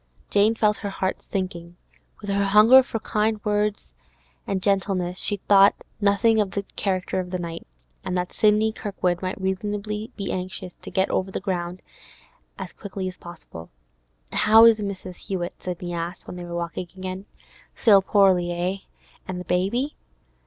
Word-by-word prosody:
Jane 210 +2 +4
felt 210 -2 +2
her 205 - -4
heart 190 -1 -2
sinking. 175 -3 -5 0.5
With 205 -1 -4
her 200 0 +1
hunger 215 +6 +8
for 250 -3 -4
kind 215 0 0 1.1
and 195 -1 0
gentle 195 +1 +1
words, 180 0 -3
she 205 - -2
thought 200 0 +7 0.2
nothing 215 +2 +3
of 205 - -1
the 200 +1 -3
character 185 -1 -1
of 180 -1 -4
the 185 - -2
night, 170 -1 -6 0.4
and 180 - -2
that 180 0 -3
Sidney 215 +1 +3
Kirkwood 185 -5 -2
might 185 +1 -3
reasonably 210 +3 -3
be 200 -2 -4
anxious 185 0 -4
to - - -10
get 190 0 0
over 190 - 0
the - - -4
ground 180 -2 -3 0.7
as - - -7
quickly 195 -2 -6
as 185 - -7
possible. 170 - -11 0.6
'How 220 +2 +7
is 225 -1 +6
Mrs. 190 -3 -6
Hewett?' 180 -3 -4
Sidney 180 -1 -5
asked, 170 +1 -5
when - - -8
they 175 -1 -7
were 170 0 -6
walking 170 +1 -4
on - - -25
again. 185 +1 -5 0.5
'Still 205 -5 +6
poorly, 190 -3 +3
eh? 175 +3 -1 0.5
And 185 -1 -4
the 180 - -7
baby? 215 - 0
190 Hz, 165 wpm, -24 LUFS, 180-210 Hz, 1.1 s, hunger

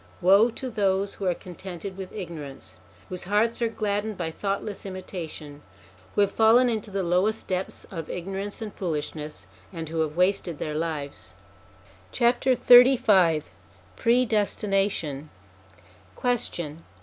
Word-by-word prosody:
Woe 195 +6 +6
to 250 +2 -6
those 195 -2 +1
who 195 - -4
are 180 - +2
contented 185 +2 -8
with 190 -1 -7
ignorance, 155 -9 -8 0.3
whose 180 -1 -5
hearts 215 +5 +1
are 235 - +3
gladdened 210 -1 -2
by 165 -2 -3
thoughtless 200 +3 -3
imitation, 170 -6 -7 0.5
who - - +4
have 200 - +3
fallen 230 +3 +5
into 220 -2 -3
the 195 -1 -2
lowest 185 +5 +1
depths 185 0 -3
of 165 -4 -6
ignorance 195 +4 -5
and 210 -2 -7
foolishness, 155 -3 -4 0.3
and 165 -2 -6
who 165 0 -3
have 155 0 -1
wasted 180 -3 +1
their 150 - -3
lives! 150 - -4 0.8
XXXV 240 - +5 0.5
PREDESTINATION 200 - +1 0.9
Question. 170 -10 -2
190 Hz, 125 wpm, -26 LUFS, 165-215 Hz, 0.9 s, Woe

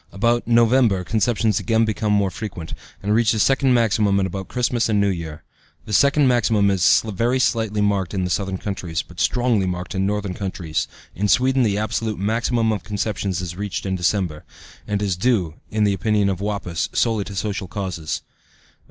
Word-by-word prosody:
About 120 +4 +1
November 115 -4 +3
conceptions 110 +1 +1
again 115 -1 +2
become 110 -1 -1
more 100 -2 +2
frequent, 90 -7 -7 0.3
and 105 +1 +1
reach 115 0 +3
the 110 - -1
second 135 +2 +3
maximum 105 -3 +2
at 95 - +1
about 95 0 -5
Christmas 120 -2 0
and 105 -2 +2
New 100 -1 +2
Year. 80 -3 -6 0.4
This 105 - -1
second 140 +2 +4
maximum 110 -5 +3
is 90 -5 +4
very 115 +4 0
slightly 110 -4 0
marked 100 -2 0
in 95 -1 0
southern 95 +1 -1
countries, 90 -5 -4
but 85 - -14
strongly 120 -6 +1
marked 90 +1 -4
in 95 0 0
northern 105 -2 -2
countries 90 -5 -3 0.3
(in 105 +3 -1
Sweden 130 +5 +3
the 105 -4 +1
absolute 110 0 -2
maximum 115 +3 0
of 105 -5 -3
conceptions 100 -1 -2
is 85 -2 -5
reached 100 +1 -4
in 95 -1 -1
December), 90 -3 -1 0.4
and 105 0 -1
is 95 -3 0
due, 90 -5 +1 0.2
in 110 0 0
the 100 -1 +3
opinion 105 0 +1
of 95 -2 -2
Wappäus, 100 -5 -2
solely 110 -3 +2
to 100 - -8
social 100 -1 -3
causes. 90 -5 -4
105 Hz, 180 wpm, -21 LUFS, 95-115 Hz, 0.4 s, second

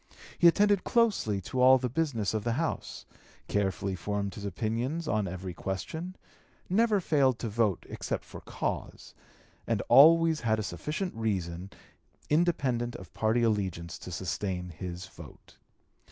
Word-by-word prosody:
He 175 - +7
attended 205 +2 +4
closely 210 - +2
to 125 +7 -3
all 130 +1 +8
the 125 0 -2
business 125 -7 -1
of 110 -1 -1
the 115 - 0
House; 160 +5 -3 0.4
carefully 100 -1 -1
formed 100 +1 -3
his 100 - -7
opinions 115 - -2
on 105 -6 0
every 90 0 -6
question; 160 - -5 0.5
never 215 +2 +3
failed 140 -8 +2
to 120 - -4
vote 105 -3 0
except - - -4
for - - -10
cause; - - -5 0.5
and - - 0
always 165 +2 +7
had 110 -2 +1
a 110 - -2
sufficient 155 - -4
reason 95 -5 -3 0.6
independent 135 -8 +1
of 90 - -11
party 110 +2 +1
allegiance 95 -7 -1
to 90 - -9
sustain 90 0 -3
his 90 +2 -6
vote. 85 -7 -14
110 Hz, 140 wpm, -29 LUFS, 95-155 Hz, 0.6 s, all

